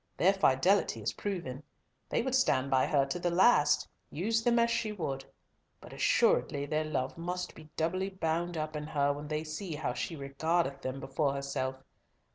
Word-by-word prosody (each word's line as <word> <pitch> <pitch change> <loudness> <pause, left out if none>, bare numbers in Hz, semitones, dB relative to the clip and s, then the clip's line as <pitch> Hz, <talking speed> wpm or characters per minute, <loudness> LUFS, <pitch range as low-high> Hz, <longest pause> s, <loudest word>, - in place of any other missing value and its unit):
Their 190 +3 +5
fidelity 155 - +2
is 110 - -1
proven. 170 -10 -4 0.5
They - - +1
would 260 0 -2
stand 140 - +2
by 130 -1 +3
her 140 -2 +3
to 135 +6 -3
the 175 - 0
last, 180 -2 +4 0.2
use 225 +8 0
them 240 0 +3
as 235 0 +3
she 220 -2 0
would, 140 -9 -3 0.6
but - - -12
assuredly 140 0 +2
their 155 +2 0
love 150 0 -2
must 180 +1 -3
be 155 -1 -14
doubly 185 +4 0
bound 175 -2 -2
up 155 0 -3
in 150 0 -4
her 145 -2 +1
when 145 +1 -7
they 155 0 -2
see 160 +2 -5
how 150 -1 -2
she 165 - -3
regardeth 140 +1 -1
them 130 +1 -4
before 135 +1 0
herself. 135 -1 -3
155 Hz, 180 wpm, -31 LUFS, 140-180 Hz, 0.6 s, Their